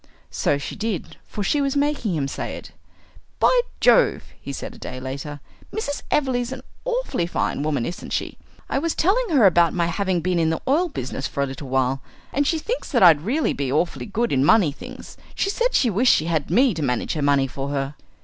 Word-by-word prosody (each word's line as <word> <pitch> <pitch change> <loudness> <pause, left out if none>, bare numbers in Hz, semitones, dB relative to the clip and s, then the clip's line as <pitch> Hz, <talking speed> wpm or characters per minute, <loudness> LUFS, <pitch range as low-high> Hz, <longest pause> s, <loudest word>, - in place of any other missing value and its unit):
So 140 - +1
she 140 - -6
did, 215 -4 -4
for 205 - -4
she 290 +8 +1
was 275 0 0
making 285 - 0
him 140 -3 -1
say - - -4
it. - - -10 0.7
"By - - +4 0.2
Jove!" - - +4 0.2
he 140 - -6
said 135 - -6
a - - -14
day 130 - -6
later, 140 +3 -6 0.3
"Mrs. 290 -10 -3
Everleigh's 255 -4 +1
an 265 - -6 0.2
awfully - - -1
fine 175 - -1
woman, 145 -5 0
isn't 175 - -6
she? - - -3 0.3
I - - 0
was 330 +2 -1
telling 435 +7 +2
her 275 -10 +5
about 175 -2 +4
my 170 -1 +2
having 185 +1 0
been 180 +1 0
in 160 -1 +2
the 160 - -1
oil 330 +7 +2
business 130 - -4
for 140 - -2
a - - +1
little 135 0 -7
while, 130 0 +1 0.3
and 285 +1 +1
she 325 - +2
thinks 465 +10 -4
that 240 -9 +3
I'd 165 -5 +7
really 265 - 0
be 140 -2 -2
awfully 170 +9 0
good 230 +3 -1
in 130 -1 +3
money 185 -1 +5
things. 140 - -11 0.2
She 395 - 0
said - - 0
she 240 - +3
wished 240 +6 +4
she 155 - 0
had 160 -3 -1
me 240 +7 +4
to 160 - -4
manage 125 -4 -1
her 155 - -3
money 140 -1 +3
for 135 +2 -5
her." 140 0 -2
175 Hz, 215 wpm, -23 LUFS, -, 0.7 s, I'd